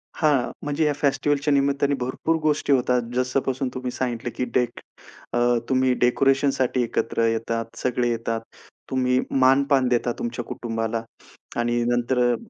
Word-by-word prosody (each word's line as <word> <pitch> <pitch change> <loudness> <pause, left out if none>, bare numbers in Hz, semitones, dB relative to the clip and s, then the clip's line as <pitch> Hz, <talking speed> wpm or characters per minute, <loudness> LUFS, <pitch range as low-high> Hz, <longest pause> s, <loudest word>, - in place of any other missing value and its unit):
हां, 145 -6 +2
म्हणजे 145 +2 0
या 150 - +2
फेस्टिव्हलच्या 145 +1 +1
निमित्ताने 140 0 +2
भरपूर 130 +6 -1
गोष्टी 150 -2 +2
होतात 125 -1 +2
जसंपासून 130 +1 0
तुम्ही 130 -1 -4
सांगितलं, 120 -2 -3
की 125 - -1
डेक 125 -1 +1 0.5
अ 120 - +1 0.3
तुम्ही 130 -1 +3
डेकोरेशनसाठी 135 0 +2
एकत्र 115 0 0
येतात, 115 0 -2
सगळे 125 -1 0
येतात. 115 -1 -2 0.5
तुम्ही 125 -1 +2 0.2
मान-पान 135 0 +4
देता 120 0 +1
तुमच्या 120 +1 -3
कुटुंबाला 115 -1 -3 0.6
आणि 120 0 +1
नंतर 120 +1 +1
अ 120 0 +3
125 Hz, 135 wpm, -24 LUFS, 120-140 Hz, 0.6 s, मान-पान